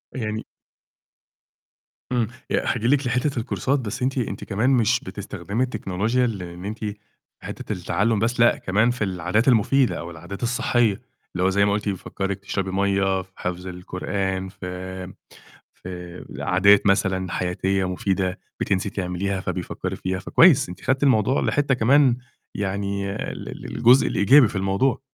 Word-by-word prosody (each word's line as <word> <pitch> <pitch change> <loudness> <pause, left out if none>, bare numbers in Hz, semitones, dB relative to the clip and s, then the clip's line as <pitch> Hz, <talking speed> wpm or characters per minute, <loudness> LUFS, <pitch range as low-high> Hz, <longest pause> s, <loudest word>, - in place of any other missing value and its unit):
يعني 110 -3 -3 1.7
آمم، 120 -3 +1 0.2
يعني - - 0
هاجي 120 -1 0
لِك 140 -1 +2
لحتة 125 +1 0
الكورسات 135 +4 -1
بس 115 +1 -5
أنتِ 130 +1 0
أنتِ 120 - -3
كمان 110 +5 0
مش 125 -1 +3
بتستخدمي 100 +3 -4
التكنولوجيا 110 +1 0
اللي 90 -7 -4
إن 90 +2 -9
أنتِ 110 +1 -5 0.6
حتة - - -5
التعلُّم 105 +4 0
بس، 120 +3 0
لأ، 120 - +5
كمان 110 +6 +2
في 120 -3 -3
العادات 95 +5 0
المفيدة 130 +2 +3
أو 85 +1 -7
العادات 85 +7 -8
الصحية، 120 -3 +1 0.3
اللي 90 - -1
هو 95 - +4
زي 100 +1 +3
ما 100 - +2
قُلتِ 105 0 -1
بيفكرِك 95 +1 -3
تشربي 95 -1 -3
مَيّة، 95 -1 +1
في 95 +1 -16
حفظ 90 +1 -4
القرآن، 95 +1 -3
في 95 0 -7 0.6
في 90 -1 -9
عادات 100 +3 +4
مثلًا 95 -2 +1
حياتية 95 +1 0
مفيدة 95 0 -1 0.2
بتنسي 95 +1 0
تعمليها 95 0 -2
فبيفكّري - - -4
فيها، 95 0 -3
فكويس 140 - +5
أنتِ 90 +1 -9
خدتِ 135 +2 0
الموضوع 130 -1 +3
لحتة 145 -2 +1
كمان 130 +1 +4 0.4
يعني 100 0 -2
ال - - -5
ال - - -7
الجزء 125 +3 +6
الإيجابي 125 +3 +5
في - - -7
الموضوع. 95 +9 +1
100 Hz, 150 wpm, -23 LUFS, 95-120 Hz, 1.7 s, الجزء